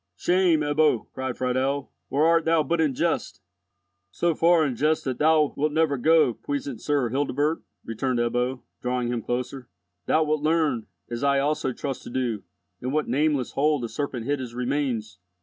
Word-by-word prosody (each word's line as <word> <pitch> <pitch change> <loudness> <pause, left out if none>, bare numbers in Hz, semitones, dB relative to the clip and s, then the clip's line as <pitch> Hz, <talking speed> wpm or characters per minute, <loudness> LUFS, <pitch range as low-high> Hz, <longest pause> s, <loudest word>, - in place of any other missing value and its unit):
"Shame, 180 -3 +3
Ebbo!" 150 -4 +1
cried 130 -1 -4
Friedel, 130 +2 -1 0.2
"or 145 +3 +2
art 165 0 +4
thou 160 -1 +3
but 170 +1 0
in 145 -5 +1
jest?" - - -1 0.7
"So 170 - 0
far 165 0 +4
in 130 -4 -2
jest 155 +5 +1
that 130 -2 -3
thou 155 -1 +4
wilt 150 +2 0
never 160 -2 +2
go, 155 -1 +4
puissant 140 -1 -5
Sir 145 -5 +1
Hildebert," 145 +3 0 0.2
returned 125 +3 -2
Ebbo, 125 +2 -1 0.2
drawing 125 -1 -1
him 120 -1 -1
closer. 125 +2 -4 0.4
"Thou 160 - +3
wilt 155 -1 0
learn—as 145 -6 -1
I 140 0 +3
also 140 -1 0
trust 135 +1 -4
to - - -7
do—in 120 0 -5
what 150 +1 0
nameless 145 -2 +1
hole 150 +1 +2
the 120 - -3
serpent 130 -2 -4
hid 145 +1 0
his 120 -2 -7
remains. 125 -5 -2
140 Hz, 165 wpm, -25 LUFS, 125-155 Hz, 0.7 s, art